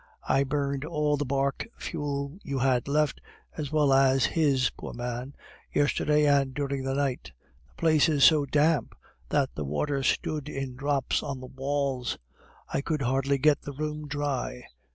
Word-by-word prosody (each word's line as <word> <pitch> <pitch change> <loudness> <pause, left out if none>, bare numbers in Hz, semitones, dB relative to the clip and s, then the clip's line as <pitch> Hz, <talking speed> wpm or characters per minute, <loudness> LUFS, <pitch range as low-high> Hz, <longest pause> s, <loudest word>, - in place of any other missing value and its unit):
I 135 - +3
burned 140 0 -1
all 150 -2 0
the 145 -1 -3
bark 140 - -1
fuel 145 0 -4
you 140 -7 -4
had 130 -1 +1
left, 150 +1 +1 0.3
as 150 -3 -4
well 150 -3 +3
as 135 -1 +4
his, 140 -6 +2
poor - - -8
man, 125 +3 -5 0.4
yesterday 150 +1 +2
and 140 -2 +3
during 140 -2 -2
the 135 0 -1
night. 140 -3 -2 0.4
The - - -29
place 160 -1 +3
is 145 -3 +2
so 150 -3 +6
damp 150 -1 +2 0.3
that - - +1
the 75 - -4
water 135 - -1
stood 150 +3 -1
in 135 -3 -4
drops 140 0 0
on 135 -2 -4
the 130 - -8
walls; 135 -1 -2 0.6
I - - +1
could 150 -1 -2
hardly 135 +2 +1
get 145 +1 +3
the 145 - -7
room 150 +1 -4
dry. 145 -4 -3
140 Hz, 165 wpm, -28 LUFS, 135-150 Hz, 0.6 s, so